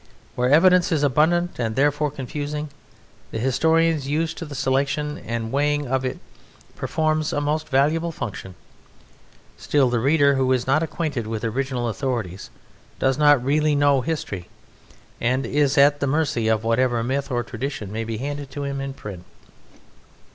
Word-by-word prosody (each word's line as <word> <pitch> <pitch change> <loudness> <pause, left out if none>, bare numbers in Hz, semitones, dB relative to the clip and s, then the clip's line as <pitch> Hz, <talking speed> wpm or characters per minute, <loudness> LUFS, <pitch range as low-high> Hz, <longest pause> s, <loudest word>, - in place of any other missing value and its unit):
Where 125 0 0
evidence 180 +5 +5
is 155 -3 +1
abundant, 160 +5 +2
and 110 -2 -1
therefore 145 +2 +2
confusing, 145 +2 -5 0.6
the - - -5
historian 160 +6 +2
used 160 +4 -1
to 165 - -5
the 145 -2 -8
selection 140 +2 -1
and 115 -1 -4
weighing 145 +1 +1
of 130 +1 0
it 130 - -3 0.6
performs 155 -1 0
a - - 0
most 150 +2 -1
valuable 155 +5 +2
function. 95 - -6 1.0
Still, 135 -4 +1
the 120 - +1
reader 140 +3 +4
who 130 -1 +1
is 125 -1 0
not 135 +4 +2
acquainted 150 -7 -3
with 110 -1 -4
original 125 +1 -2
authorities 115 -6 -3 0.5
does 135 +1 +1
not 145 -4 +5
really 150 +2 +2
know 140 -2 +3
history 120 - -4 0.7
and 130 +3 +1
is 145 0 +1
at 145 +1 +5
the 140 - 0
mercy 140 -5 0
of 110 0 +1
whatever 115 +1 +1
myth 135 +4 -2
or 120 -2 -1
tradition 120 -3 -5
may 110 +2 -3
be 115 -1 -4
handed 145 +2 -5
to 145 +1 -5
him 140 -1 -3
in 135 0 -5
print. 95 -7 -8
140 Hz, 160 wpm, -23 LUFS, 125-150 Hz, 1.0 s, evidence